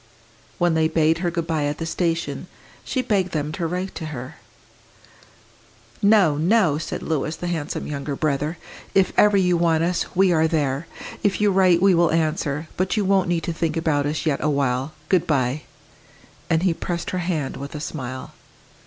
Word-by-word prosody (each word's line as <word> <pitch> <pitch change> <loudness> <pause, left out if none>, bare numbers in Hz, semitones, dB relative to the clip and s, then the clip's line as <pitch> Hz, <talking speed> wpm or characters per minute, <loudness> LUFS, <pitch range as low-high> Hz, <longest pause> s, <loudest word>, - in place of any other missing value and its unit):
When 175 -1 +2
they 160 0 +3
bade 160 0 +2
her 175 -1 0
good 170 -1 -2
bye 160 -3 0
at 145 +1 -2
the 165 - -4
station, 165 0 -2 0.4
she 255 - -1
begged 190 -6 0
them 150 -1 -1
to 165 +1 -2
write 180 +3 -3
to 160 - -6
her. 130 -4 -7 1.6
"No, 200 -8 +5
no!" 170 -2 +3
said 160 - -5
Louis, 155 0 -1
the - - -6
handsome 165 -4 -3
younger 140 -1 -4
brother. 150 +2 -1 0.4
"If 195 -1 +3
ever 210 -1 +5
you 180 -2 +3
want 165 -1 +2
us, 175 +1 0
we 190 0 +4
are 160 0 +3
there. 145 -1 -1 0.3
If 200 -1 +1
you 210 -1 +3
write, 185 -2 +4
we 195 -1 +6
will 170 -1 +4
answer. 155 -1 0
But 185 +4 0
you 205 - +1
won't 190 -2 +2
need 170 -2 0
to 170 - -2
think 165 0 -1
about 150 -3 +1
us 150 +2 -2
yet 150 -3 +1
awhile. 140 -1 0
Good 185 -1 +2
bye!" 135 -1 +1 0.9
And 165 0 +2
he 185 -3 +3
pressed 170 +1 -4
her 185 - -1
hand 165 -6 -2
with 140 +2 -7
a - - -4
smile. 130 -4 -6
165 Hz, 185 wpm, -23 LUFS, 150-180 Hz, 1.6 s, we